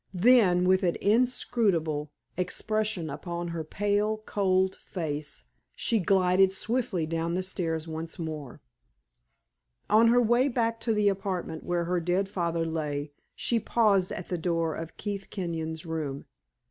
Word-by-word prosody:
Then, 180 Hz, -4 st, +5 dB
with 185 Hz, +1 st, +4 dB
an 175 Hz, -3 st, +1 dB
inscrutable 200 Hz, -, +1 dB, 0.2 s
expression 210 Hz, 0 st, -1 dB
upon 170 Hz, +3 st, -5 dB
her 165 Hz, -1 st, -3 dB
pale, 205 Hz, +5 st, 0 dB
cold 190 Hz, -1 st, +1 dB
face, 150 Hz, -4 st, -5 dB, 0.3 s
she 230 Hz, -3 st, +1 dB
glided 190 Hz, 0 st, +4 dB
swiftly 215 Hz, -3 st, -1 dB
down 165 Hz, +1 st, -2 dB
the 185 Hz, -, -1 dB
stairs 165 Hz, -3 st, -2 dB
once 160 Hz, +2 st, -5 dB
more. 155 Hz, -, -6 dB, 1.3 s
On 220 Hz, +2 st, +6 dB
her 240 Hz, +2 st, +5 dB
way 240 Hz, +3 st, +3 dB
back 230 Hz, -3 st, 0 dB
to 225 Hz, 0 st, 0 dB
the 210 Hz, -1 st, +3 dB
apartment 190 Hz, -5 st, -2 dB
where 175 Hz, -1 st, 0 dB
her 180 Hz, +1 st, 0 dB
dead 180 Hz, +3 st, 0 dB
father 170 Hz, -4 st, -1 dB
lay, 150 Hz, -3 st, -3 dB, 0.2 s
she 235 Hz, -, +1 dB
paused 200 Hz, -5 st, +2 dB
at 175 Hz, -, -6 dB
the 180 Hz, -, -2 dB
door 165 Hz, -1 st, 0 dB
of 165 Hz, +1 st, -7 dB
Keith 200 Hz, -2 st, -5 dB
Kenyon's 165 Hz, -4 st, -4 dB
room. 155 Hz, -4 st, -4 dB
180 Hz, 140 wpm, -28 LUFS, 165-205 Hz, 1.3 s, On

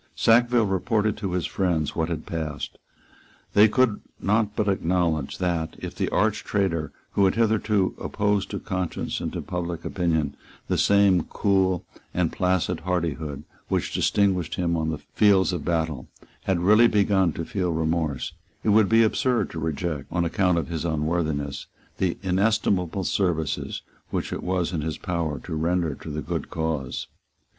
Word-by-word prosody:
Sackville 120 Hz, 0 st, +4 dB
reported 105 Hz, +2 st, +1 dB
to 100 Hz, -4 st, -3 dB
his 90 Hz, -2 st, 0 dB
friends 85 Hz, -6 st, 0 dB
what 80 Hz, 0 st, 0 dB
had 80 Hz, -2 st, -4 dB
passed. 80 Hz, -3 st, -4 dB, 0.7 s
They 105 Hz, +2 st, +7 dB
could 110 Hz, -1 st, +2 dB, 0.2 s
not 105 Hz, +1 st, +1 dB
but 105 Hz, -, 0 dB
acknowledge 85 Hz, -6 st, 0 dB
that, 85 Hz, -3 st, -1 dB
if -, -, -6 dB
the -, -, -1 dB
arch -, -, +1 dB
traitor, 85 Hz, -7 st, 0 dB, 0.2 s
who 100 Hz, -, +3 dB
had 95 Hz, -, +2 dB
hitherto 110 Hz, -3 st, +2 dB
opposed 105 Hz, -1 st, 0 dB
to -, -, -4 dB
conscience 90 Hz, -3 st, -3 dB
and -, -, -3 dB
to -, -, -4 dB
public 85 Hz, -2 st, -4 dB
opinion 80 Hz, -5 st, 0 dB, 0.3 s
the -, -, 0 dB
same 100 Hz, -4 st, +4 dB
cool 95 Hz, -3 st, +1 dB, 0.3 s
and 85 Hz, -2 st, +1 dB
placid 90 Hz, -2 st, 0 dB
hardihood 80 Hz, -5 st, -2 dB, 0.2 s
which -, -, -1 dB
distinguished 95 Hz, -5 st, +1 dB
him 85 Hz, -1 st, 0 dB
on 80 Hz, -1 st, -1 dB, 0.2 s
fields 95 Hz, -3 st, +4 dB
of 85 Hz, -5 st, -3 dB
battle, 80 Hz, -5 st, -1 dB, 0.4 s
had 95 Hz, -3 st, +1 dB
really 105 Hz, +6 st, +6 dB
begun 100 Hz, -4 st, +3 dB
to 85 Hz, -, -4 dB
feel 90 Hz, -2 st, -1 dB
remorse, 80 Hz, -3 st, -1 dB, 0.3 s
it -, -, +1 dB
would 105 Hz, -1 st, +5 dB
be 115 Hz, +1 st, +6 dB
absurd 120 Hz, +2 st, +1 dB
to 80 Hz, -, -5 dB
reject, 80 Hz, -2 st, -3 dB
on 85 Hz, -1 st, +1 dB
account 90 Hz, 0 st, +2 dB
of 85 Hz, -, -1 dB
his 85 Hz, -2 st, -3 dB
unworthiness, 80 Hz, -3 st, -1 dB, 0.3 s
the 90 Hz, -2 st, 0 dB
inestimable 95 Hz, -1 st, +1 dB
services 85 Hz, -6 st, -1 dB, 0.3 s
which -, -, -2 dB
it -, -, -4 dB
was 90 Hz, -1 st, -1 dB
in 80 Hz, -, -1 dB
his 80 Hz, +1 st, -3 dB
power 85 Hz, -4 st, -2 dB
to 65 Hz, -, -7 dB
render 85 Hz, 0 st, 0 dB
to 80 Hz, -, -9 dB
the 75 Hz, 0 st, -4 dB
good -, -, -3 dB
cause. 80 Hz, -5 st, -2 dB
90 Hz, 160 wpm, -25 LUFS, 80-100 Hz, 0.7 s, They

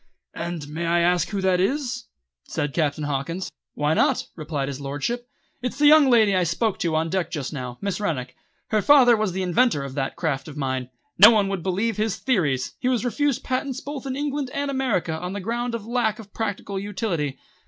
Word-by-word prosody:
"And 170 Hz, -3 st, -5 dB
may 160 Hz, +3 st, -3 dB
I 170 Hz, +1 st, +3 dB
ask 175 Hz, -1 st, +2 dB
who 200 Hz, -2 st, -2 dB
that 185 Hz, -1 st, +2 dB
is?" 250 Hz, +3 st, -1 dB, 0.4 s
said 145 Hz, -3 st, -2 dB
Captain 150 Hz, -2 st, 0 dB
Hawkins. 145 Hz, +6 st, -3 dB, 0.2 s
"Why 150 Hz, +1 st, +1 dB
not?" -, -, +2 dB
replied 150 Hz, -4 st, -3 dB
his 140 Hz, 0 st, -5 dB
lordship. 145 Hz, -, -3 dB, 0.3 s
"It's 250 Hz, +1 st, -3 dB
the 295 Hz, -, +3 dB
young 300 Hz, -2 st, +7 dB
lady 220 Hz, -5 st, +5 dB
I 185 Hz, -, +3 dB
spoke 185 Hz, +5 st, 0 dB
to 165 Hz, -2 st, 0 dB
on 160 Hz, +1 st, 0 dB
deck 185 Hz, -3 st, 0 dB
just 150 Hz, -4 st, -4 dB
now, 125 Hz, -3 st, -5 dB
Miss 200 Hz, 0 st, -2 dB
Rennick. 135 Hz, -11 st, -2 dB, 0.3 s
Her 215 Hz, -1 st, +2 dB
father 255 Hz, -2 st, +7 dB
was 215 Hz, -3 st, 0 dB
the 190 Hz, +1 st, -2 dB
inventor 180 Hz, -, +2 dB
of 135 Hz, -1 st, -6 dB
that 135 Hz, -1 st, -2 dB
craft 145 Hz, -5 st, -2 dB
of 150 Hz, -1 st, -9 dB
mine. 130 Hz, -3 st, -2 dB, 0.3 s
No 205 Hz, +4 st, +11 dB
one 210 Hz, -4 st, +3 dB
would 195 Hz, -3 st, -2 dB
believe 195 Hz, +5 st, -1 dB
his 215 Hz, -1 st, 0 dB
theories. 165 Hz, -, 0 dB
He -, -, -1 dB
was 250 Hz, -2 st, 0 dB
refused 285 Hz, +2 st, 0 dB
patents 260 Hz, 0 st, -2 dB
both 280 Hz, -1 st, -6 dB
in 260 Hz, -, -2 dB
England 285 Hz, -1 st, -2 dB
and 280 Hz, 0 st, -1 dB
America 240 Hz, -12 st, 0 dB
on 180 Hz, +3 st, -5 dB
the 205 Hz, -, -3 dB
ground 235 Hz, +4 st, -2 dB
of 220 Hz, -3 st, -6 dB
lack 230 Hz, -2 st, 0 dB
of 210 Hz, -3 st, -12 dB
practical 205 Hz, -2 st, -3 dB
utility. 190 Hz, -8 st, -2 dB
190 Hz, 205 wpm, -24 LUFS, 155-240 Hz, 0.4 s, No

